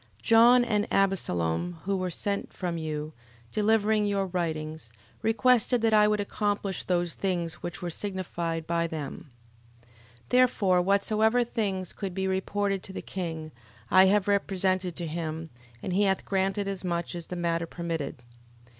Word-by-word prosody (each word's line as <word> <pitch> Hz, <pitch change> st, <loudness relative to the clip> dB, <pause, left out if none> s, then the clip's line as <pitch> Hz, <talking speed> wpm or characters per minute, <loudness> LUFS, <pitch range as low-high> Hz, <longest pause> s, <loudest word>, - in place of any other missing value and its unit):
John, 240 Hz, +2 st, +6 dB
and 210 Hz, -3 st, +1 dB
Abesalom, 175 Hz, -, 0 dB
who 195 Hz, +1 st, 0 dB
were 185 Hz, -1 st, -1 dB
sent 200 Hz, +3 st, -2 dB
from 175 Hz, -3 st, -3 dB
you, 155 Hz, -1 st, -4 dB, 0.4 s
delivering 215 Hz, 0 st, +2 dB
your 200 Hz, -1 st, 0 dB
writings, 160 Hz, -7 st, -3 dB, 0.3 s
requested 230 Hz, +1 st, +3 dB
that 225 Hz, -1 st, +3 dB
I 210 Hz, 0 st, +6 dB
would 210 Hz, 0 st, +1 dB
accomplish 205 Hz, -1 st, -1 dB
those 175 Hz, -2 st, 0 dB
things 175 Hz, -4 st, -2 dB
which 175 Hz, 0 st, -6 dB
were 175 Hz, -, -2 dB
signified 170 Hz, -4 st, -3 dB
by 170 Hz, 0 st, 0 dB
them. 150 Hz, -2 st, -6 dB, 0.5 s
11:18. 120 Hz, -, -27 dB, 0.4 s
Therefore 215 Hz, -8 st, +4 dB
whatsoever 215 Hz, +5 st, +2 dB
things 195 Hz, -6 st, -2 dB
could 195 Hz, -3 st, -5 dB
be 190 Hz, 0 st, -1 dB
reported 195 Hz, +1 st, -1 dB
to 190 Hz, -, -9 dB
the -, -, -6 dB
king, 160 Hz, -4 st, -5 dB, 0.4 s
I 185 Hz, 0 st, +8 dB
have 205 Hz, 0 st, +3 dB
represented 185 Hz, -3 st, +1 dB
to 175 Hz, -, -4 dB
him: 160 Hz, 0 st, -4 dB, 0.3 s
and 185 Hz, -, -2 dB
he 205 Hz, +2 st, +3 dB
hath 190 Hz, -1 st, +1 dB
granted 195 Hz, +1 st, 0 dB
as 195 Hz, -1 st, -3 dB
much 170 Hz, -1 st, -2 dB
as 170 Hz, -1 st, -6 dB
the 180 Hz, -, -5 dB
matter 170 Hz, -1 st, -1 dB
permitted. 165 Hz, -7 st, -4 dB
185 Hz, 155 wpm, -28 LUFS, 170-205 Hz, 0.5 s, I